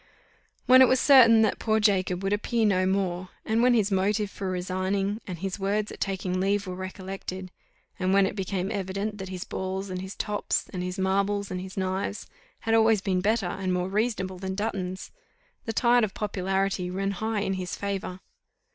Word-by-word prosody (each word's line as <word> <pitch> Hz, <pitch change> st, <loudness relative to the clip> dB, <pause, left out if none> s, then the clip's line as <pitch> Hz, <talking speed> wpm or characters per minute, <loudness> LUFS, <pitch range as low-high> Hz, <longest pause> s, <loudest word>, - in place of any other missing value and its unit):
When 255 Hz, +1 st, +8 dB
it 260 Hz, -, +8 dB
was 260 Hz, +1 st, +3 dB
certain 230 Hz, -5 st, +7 dB
that 215 Hz, -, +1 dB
poor 220 Hz, -1 st, +1 dB
Jacob 190 Hz, -3 st, +1 dB
would 195 Hz, +1 st, +1 dB
appear 225 Hz, +2 st, 0 dB
no 185 Hz, -3 st, +2 dB
more 185 Hz, -1 st, -1 dB, 0.2 s
and 220 Hz, +1 st, +1 dB
when 245 Hz, 0 st, +5 dB
his 215 Hz, -3 st, +2 dB
motive 200 Hz, +2 st, +1 dB
for 195 Hz, -2 st, -4 dB
resigning, 190 Hz, +3 st, -1 dB
and 180 Hz, -3 st, -5 dB
his 190 Hz, +3 st, -4 dB
words 205 Hz, +2 st, -1 dB
at -, -, -10 dB
taking 185 Hz, -2 st, -1 dB
leave 200 Hz, +2 st, +1 dB
were 185 Hz, -, -5 dB
recollected 185 Hz, 0 st, -6 dB, 0.5 s
and 185 Hz, 0 st, +1 dB
when 195 Hz, 0 st, +5 dB
it 190 Hz, -, -3 dB
became 190 Hz, -1 st, -2 dB
evident 200 Hz, +2 st, -3 dB
that 190 Hz, -1 st, -6 dB
his 185 Hz, -1 st, -5 dB
balls, 190 Hz, +1 st, -4 dB
and 185 Hz, 0 st, -4 dB
his 190 Hz, +1 st, -7 dB
tops, 210 Hz, -1 st, -1 dB
and 180 Hz, -, -3 dB
his 180 Hz, +1 st, -4 dB
marbles, 200 Hz, +1 st, 0 dB
and 180 Hz, 0 st, -3 dB
his 190 Hz, +1 st, -9 dB
knives, 190 Hz, +2 st, -2 dB, 0.4 s
had 225 Hz, -, 0 dB
always 225 Hz, -1 st, +5 dB
been 185 Hz, -2 st, 0 dB
better 215 Hz, +1 st, +1 dB
and 185 Hz, +1 st, -2 dB
more 180 Hz, +1 st, -1 dB
reasonable 195 Hz, -3 st, -1 dB
than 190 Hz, 0 st, -4 dB
Dutton's, 190 Hz, -3 st, -3 dB, 0.5 s
the 225 Hz, -, -2 dB
tide 240 Hz, +1 st, +4 dB
of 205 Hz, -3 st, -2 dB
popularity 195 Hz, -2 st, -1 dB
ran 195 Hz, +2 st, -1 dB
high 220 Hz, +2 st, -2 dB
in 195 Hz, -1 st, -1 dB
his 185 Hz, -1 st, -4 dB
favour. 195 Hz, -2 st, -4 dB
195 Hz, 190 wpm, -27 LUFS, 185-210 Hz, 0.5 s, When